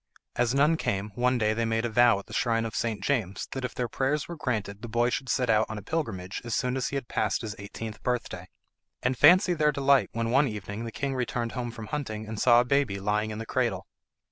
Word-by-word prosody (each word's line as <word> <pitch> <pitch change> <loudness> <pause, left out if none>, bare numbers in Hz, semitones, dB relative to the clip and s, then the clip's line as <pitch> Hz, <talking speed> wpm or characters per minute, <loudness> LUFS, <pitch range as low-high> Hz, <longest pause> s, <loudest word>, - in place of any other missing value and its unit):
As 120 +1 +1
none 150 +4 +4
came, 100 -6 -2
one 125 +2 +1
day 110 -2 +2
they 115 +1 -1
made 115 +1 0
a - - -1
vow 120 -1 +5
at 100 - -8
the - - -12
shrine 115 -1 +1
of 115 - -5
St. 115 -3 -2
James 110 -9 -1
that 130 - -4
if 125 - -4
their 125 - -1
prayers 135 +5 -1
were 170 - -6
granted 110 -8 -3
the 120 - -6
boy 120 +2 +1
should 130 0 -3
set 125 +1 +1
out 110 0 +3
on 110 - -5
a 105 - -7
pilgrimage 95 - -3
as 120 -1 -2
soon 125 -1 0
as 130 - -1
he - - -4
had 135 -3 -3
passed 105 -3 0
his 110 -1 -5
eighteenth 105 +2 -7
birthday. 115 -7 -3 0.6
And 125 +1 +1
fancy 180 - +6
their 150 -2 +2
delight 140 -1 +3
when 115 0 -1
one 135 +3 +4
evening 105 0 -5
the 115 - -5
king 140 +4 -2
returned 120 -2 -2
home 125 -2 -3
from 115 -1 -8
hunting 110 -6 -4
and 110 -1 -5
saw 120 -1 +6
a - - -2
baby 130 -7 +1
lying 105 +2 0
in 105 - -5
the 115 - -5
cradle. - - -1
120 Hz, 245 wpm, -27 LUFS, 110-130 Hz, 0.6 s, fancy